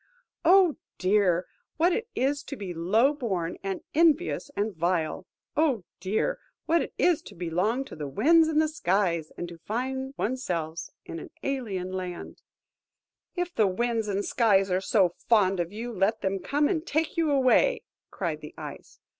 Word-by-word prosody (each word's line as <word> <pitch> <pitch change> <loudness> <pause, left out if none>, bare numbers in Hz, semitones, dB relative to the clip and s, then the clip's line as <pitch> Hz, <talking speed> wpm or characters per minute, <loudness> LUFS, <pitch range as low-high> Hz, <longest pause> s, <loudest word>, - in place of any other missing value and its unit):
Oh 365 -3 +5 0.2
dear, 185 -2 +2 0.3
what 345 +3 +3
it 460 +3 -2
is 280 +3 +1
to 280 - -6
be 195 -7 -6
low 215 - +3
born, 190 - -3
and 195 -1 -3
envious, 325 0 +2
and 205 -1 -1
vile! 170 +1 -1 0.3
Oh 285 - +2 0.2
dear, 215 - -1 0.3
what 335 +1 +3
it - - -4
is 350 -4 +3
to - - -13
belong 185 +10 0
to - - -10
the 150 -2 -5
winds 320 - +4
and 310 -1 +2
the 315 - +3
skies, 180 - 0
and 175 - -4
to 170 -1 -11
find 265 +7 -3
one's 255 +3 -2
self 165 -2 -3 0.2
in 165 - -6
an - - -9
alien 210 -10 -2
land!" 185 -2 -6 0.9
"If 355 -1 -2
the 215 - +3
winds 225 +3 0
and 200 -2 -1
the 200 - -1
skies 200 -6 +3
are 185 +1 +2
so 190 -5 +3 0.2
fond 195 -5 +4
of 170 0 -1
you, 230 +3 -5
let 205 +3 +1
them 195 0 -1
come 290 +9 +1
and 320 -3 -1
take 320 -1 -1
you 330 -2 +1
away," 285 - +3 0.3
cried - - -3
the - - -10
Ice. - - -9
220 Hz, 175 wpm, -27 LUFS, 185-290 Hz, 0.9 s, Oh